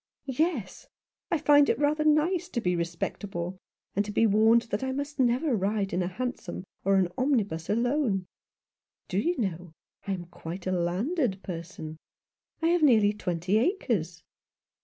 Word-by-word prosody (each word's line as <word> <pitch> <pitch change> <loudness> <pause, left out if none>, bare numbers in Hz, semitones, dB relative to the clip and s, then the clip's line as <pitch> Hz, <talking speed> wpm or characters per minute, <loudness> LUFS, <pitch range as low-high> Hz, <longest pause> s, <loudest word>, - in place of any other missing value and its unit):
" - - -66
Yes; 265 - -1 0.4
I 335 - +2
find 290 -1 +5
it - - +2
rather 295 +2 +2
nice 325 +4 +2
to 245 - -2
be 180 -5 0
respectable, 175 +2 -4 0.4
and 205 - +2
to 210 - -6
be 225 - +3
warned 220 +2 +5
that 205 - -1
I 265 - -1
must 285 +2 -4
never 255 +2 +2
ride 200 -1 -1
in 180 - +1
a 175 - 0
hansom 190 -3 -4 0.2
or 195 +1 +3
an 185 -2 +3
omnibus 210 - 0
alone. 235 -3 +1 0.8
Do 185 - 0
you 345 +10 0
know 180 -6 -3 0.3
that - - -1
I - - +1
am 175 -1 -7
quite 175 +1 -8
a 185 - 0
landed 190 - 0
person? 165 -3 -7 0.7
I 330 - +4
have 350 0 +3
nearly 220 -8 +5
twenty 180 0 0
acres." 225 - -1
210 Hz, 165 wpm, -28 LUFS, 180-280 Hz, 0.8 s, find